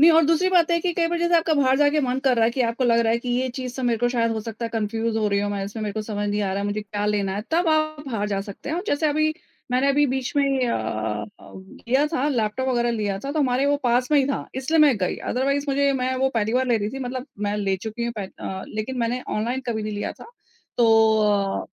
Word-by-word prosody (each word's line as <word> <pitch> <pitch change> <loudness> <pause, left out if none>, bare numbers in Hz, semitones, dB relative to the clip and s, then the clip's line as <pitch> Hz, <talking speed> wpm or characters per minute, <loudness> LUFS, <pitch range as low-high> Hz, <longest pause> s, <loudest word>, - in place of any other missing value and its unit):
नहीं 325 +3 +8
और 325 0 +5
दूसरी 330 +3 +3
बात 345 -2 +4
है 340 - +3
कि 355 +1 0
कई 335 0 +2
बार 345 0 -1
जैसे 345 0 +3
आपका 325 -1 +2
बाहर 265 -2 +3
जाके 295 +1 +3
मन 255 -2 0
कर 265 -2 +2
रहा 225 - +4
है 225 - +3
कि 255 - -3
आपको 235 +2 0
लग 235 -1 +4
रहा 225 -1 +2
है 230 - +1
कि 245 - -7
ये 250 +2 0
चीज़ 255 0 -5
से 260 - -5
मेरे 235 -2 +1
को 245 +1 +2
शायद 230 -2 +1
हो 220 - -2
सकता 225 +1 -6
है - - -1
कन्फ्यूज़ 225 0 -2
हो 215 -1 +1
रही 200 0 +1
हूँ 205 0 -1
मैं, 200 -1 -2
इसमें 210 +2 -6
मेरे 210 -1 -2
को 215 - -3
समझ 205 -1 -3
नहीं 205 +1 -1
आ 200 - -1
रहा 195 - -2
है, - - -2
मुझे 205 +1 -2
क्या 205 0 -4
लेना 200 -2 0
है, 210 - -3
तब 335 +1 +2
आप 310 0 +1
बाहर 215 -5 -2
जा 195 -1 -1
सकते 200 +6 -9
हैं 315 - -1
और 355 - -2
जैसे 285 +2 +1
अभी 310 +1 +1 0.4
मैंने 255 +3 +2
अभी 290 +1 +3
बीच 260 -1 -2
में 270 -3 +2
अ - - 0
अ, 110 -1 -3
किया 235 +9 -2
था 295 -2 -1
लैपटॉप 245 -1 -1
वगैरह 240 -2 +1
लिया 210 -4 -2
था, 275 +7 -5
तो 315 - -2
हमारे 265 -1 +2
वो 285 0 +3
पास 245 +1 +1
में 295 - +6
ही 275 - +3
था। 275 - -2
इसलिए 270 +5 0
मैं 290 -5 +5
गई 180 -2 -1
अदरवाइज़ 275 +3 0
मुझे 280 0 +2
मैं 260 0 -1
वो 265 +1 +2
पहली 220 -1 0
बार 260 +1 +2
ले 240 -2 +3
रही 205 0 -2
थी, 270 - -6
मतलब 255 0 -4 0.2
मैं 205 +1 -1
ले 195 -2 0
चुकी 220 +4 -5
हूँ 235 - -2
पेह 200 - -3
अ, 190 0 -5
लेकिन 215 +5 -4
मैंने 240 +1 -1 0.2
ऑनलाइन 240 +5 -1
कभी 220 -3 -2
नहीं 215 0 -4
लिया 205 - -3
था। - - -14 0.5
तो 240 - +5 0.8
अ, - - -11
245 Hz, 285 wpm, -23 LUFS, 215-280 Hz, 0.8 s, नहीं